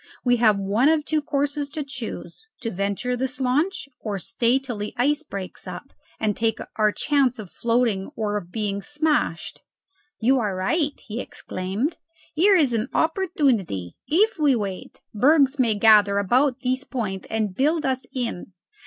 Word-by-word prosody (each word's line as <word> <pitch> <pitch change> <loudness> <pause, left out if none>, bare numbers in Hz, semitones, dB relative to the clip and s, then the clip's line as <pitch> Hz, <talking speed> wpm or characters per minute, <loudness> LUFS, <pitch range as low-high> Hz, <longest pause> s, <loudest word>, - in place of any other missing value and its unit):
We 245 0 +4
have 220 -3 +4
one 205 +8 +2
of 315 -2 +2
two 310 -1 0
courses 285 -1 -1
to 300 +1 -4
choose: 280 - -7
to 230 -2 -3
venture 200 +6 -1
this 255 +1 -3
launch, 285 +7 0
or 210 -3 -3
stay 230 +7 +2
till 260 -5 -5
the 210 +1 -5
ice 290 +5 +2
breaks 200 -11 -7
up, - - -8 0.3
and 210 -2 0
take 225 -1 0 0.2
our 215 -1 +3
chance 270 -1 +1
of 205 -5 -9
floating 230 -5 0
or 210 -2 -2
of 175 -2 -15
being 205 -2 -2
smashed." 295 +4 -1 0.6
"You 260 +4 +3
are 205 -5 -1
right," 290 - 0
he 225 +2 -5
exclaimed. 195 - -4 0.4
"Here 390 +6 +5
is 290 -9 +3
an 225 +2 -1
opportunity. 270 - 0
If 395 +4 +2
we 290 -4 +4
wait, 200 -4 -5
bergs 275 +4 +4
may 230 -4 +3
gather 205 -1 +5
about 250 +6 +2
this 255 +1 0
point 210 -9 -4
and 215 -3 -1
build 300 - +1
us 265 -1 -1
in. 235 -8 -4
245 Hz, 160 wpm, -24 LUFS, 210-290 Hz, 0.6 s, Here